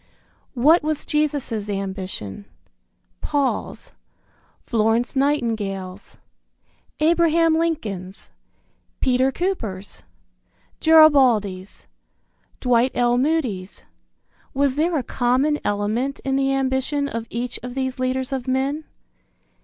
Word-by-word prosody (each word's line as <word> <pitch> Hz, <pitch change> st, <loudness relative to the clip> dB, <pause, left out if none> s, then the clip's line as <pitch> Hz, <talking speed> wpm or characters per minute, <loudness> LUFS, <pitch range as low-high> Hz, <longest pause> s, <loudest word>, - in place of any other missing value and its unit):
What 300 Hz, +8 st, +5 dB
was 305 Hz, -1 st, -2 dB
Jesus' 285 Hz, -8 st, -1 dB
ambition? 190 Hz, -, -5 dB, 0.8 s
Paul's? 285 Hz, -3 st, -2 dB, 0.7 s
Florence 225 Hz, +3 st, +1 dB
Nightingale's? 215 Hz, -9 st, -2 dB, 0.8 s
Abraham 330 Hz, 0 st, +3 dB
Lincoln's? 215 Hz, -, -3 dB, 0.7 s
Peter 260 Hz, +1 st, +2 dB
Cooper's? 225 Hz, -, -4 dB, 0.8 s
Garibaldi's? 255 Hz, -12 st, +4 dB, 0.7 s
Dwight 250 Hz, 0 st, +2 dB
L. 240 Hz, 0 st, +2 dB
Moody's? 255 Hz, -11 st, -2 dB, 0.7 s
Was 280 Hz, -1 st, +2 dB
there 320 Hz, +4 st, +1 dB
a 270 Hz, -, -1 dB
common 260 Hz, +6 st, +1 dB
element 215 Hz, +7 st, -1 dB
in 270 Hz, 0 st, 0 dB
the 270 Hz, 0 st, +1 dB
ambition 270 Hz, +2 st, 0 dB
of 230 Hz, -3 st, -5 dB
each 245 Hz, +1 st, -4 dB
of 250 Hz, 0 st, -7 dB
these 260 Hz, -1 st, -3 dB
leaders 255 Hz, +1 st, -1 dB
of 265 Hz, -1 st, -4 dB
men? 270 Hz, +4 st, -1 dB
260 Hz, 90 wpm, -22 LUFS, 220-290 Hz, 0.8 s, What